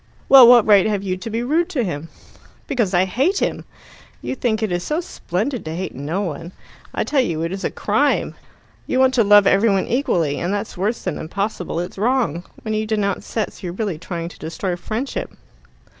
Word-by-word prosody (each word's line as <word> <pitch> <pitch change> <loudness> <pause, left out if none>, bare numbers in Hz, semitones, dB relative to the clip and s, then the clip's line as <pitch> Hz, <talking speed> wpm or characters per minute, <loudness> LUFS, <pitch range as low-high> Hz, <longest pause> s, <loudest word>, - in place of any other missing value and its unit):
"Well, 265 -3 +10
what 240 -2 +7
right 205 -2 +5
have 205 -2 -1
you 185 -2 -1
to 225 +5 -7
be 225 +2 -2
rude 320 +7 +1
to 260 -6 -1
him?" 165 -4 -4 0.6
"Because 235 -9 0
I 185 0 +3
hate 275 - +1
him. - - -2 0.5
You - - -4
think 225 -4 -1
it 215 - -1
is 175 0 -1
so 305 - -1
splendid 245 - -3
to 160 +1 -4
hate 185 +2 -4
no 150 +9 -3
one. 170 -1 -5 0.4
I - - -1
tell 285 -3 +2
you 165 -9 -2
it 165 - -2
is 195 +1 -5
a - - 0
crime. - - 0 0.5
You - - 0
want 260 0 +4
to 240 -3 +4
love 205 0 +6
every 200 +4 +4
one 195 -2 +1
equally, 175 - 0
and 175 - -2
that's 205 +1 -3
worse 205 +6 -2
than 185 -5 -3
impossible 185 0 -3
it's 175 +2 -5
wrong. 225 - 0 0.2
When 220 - -3
you 215 0 -1
denounce 205 -3 -1
sets, 220 - -3
you're 175 -3 -5
really 195 -5 -3
trying 170 -1 -5
to - - -15
destroy 175 +3 -3
friendship." 225 +9 -4
200 Hz, 205 wpm, -20 LUFS, 175-235 Hz, 0.6 s, Well